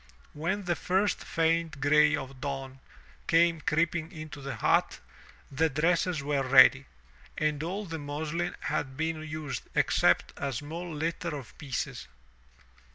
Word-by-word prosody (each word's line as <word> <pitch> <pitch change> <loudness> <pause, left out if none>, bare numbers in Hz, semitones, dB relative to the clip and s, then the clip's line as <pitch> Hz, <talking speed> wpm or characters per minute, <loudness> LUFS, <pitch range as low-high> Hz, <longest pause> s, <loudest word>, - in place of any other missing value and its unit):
When 180 +7 -2
the 175 -1 0
first 190 +4 0
faint 165 -2 0
gray 150 +2 +5
of 135 -2 -7
dawn 135 -2 -5 0.5
came 165 -1 +3
creeping 160 +1 0
into 155 -4 -8
the 135 0 -5
hut, - - +2 0.5
the 160 +4 +2
dresses 165 +1 +1
were 140 -1 0
ready, 130 0 +6 0.5
and 150 -1 0
all 190 +6 -3
the 165 -3 -5
muslin 155 +4 -3
had 130 -1 -2
been 160 0 -2
used 155 -2 -5
except - - +3
a 140 -1 -2
small 165 +7 -5
litter 160 +1 -3
of 130 -5 -11
pieces. 135 -5 -4
155 Hz, 135 wpm, -29 LUFS, 140-165 Hz, 0.5 s, ready